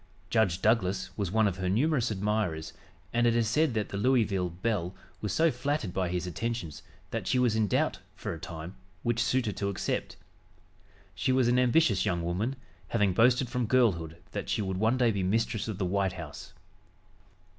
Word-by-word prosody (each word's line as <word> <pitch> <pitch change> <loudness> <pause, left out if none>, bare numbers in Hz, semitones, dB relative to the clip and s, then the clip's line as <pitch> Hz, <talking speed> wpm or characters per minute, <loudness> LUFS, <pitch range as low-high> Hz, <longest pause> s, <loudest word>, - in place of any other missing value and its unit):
Judge 95 -6 +2
Douglas 100 -4 +1
was 100 -4 -2
one 110 +2 +3
of 95 -2 -2
her 95 -1 -1
numerous 125 - +2
admirers, 105 -6 -1 0.4
and 120 0 +3
it 115 - +3
is 115 -2 +2
said 145 +2 +2
that 105 -2 -1
the 100 - -4
Louisville 105 -6 +2
belle 95 0 -2 0.3
was 105 - -2
so 165 0 +3
flattered 125 -6 -2
by 95 -2 0
his 90 0 -2
attentions 100 - -4 0.3
that - - -3
she - - +2
was 125 -3 +3
in 110 -1 +2
doubt, - - +1 0.2
for - - -4
a 80 - -8
time, 85 0 -7 0.3
which 120 -1 +1
suitor 125 -4 +1
to 100 +1 -2
accept. 100 - -2 1.0
She 130 - 0
was 130 -2 +3
an 125 +1 +3
ambitious 125 - +3
young 85 -5 0
woman, 95 +10 -1 0.3
having 105 -4 +2
boasted 125 +5 +4
from 120 -1 -1
girlhood 90 -11 +2
that - - -4
she 105 - 0
would 95 -1 -2
one 110 +5 +2
day 120 -3 +3
be 100 -2 -1
mistress 110 +3 0
of 110 -4 -4
the 95 - -1
White 95 0 0
House. 80 -6 -8
105 Hz, 190 wpm, -29 LUFS, 95-120 Hz, 1.0 s, boasted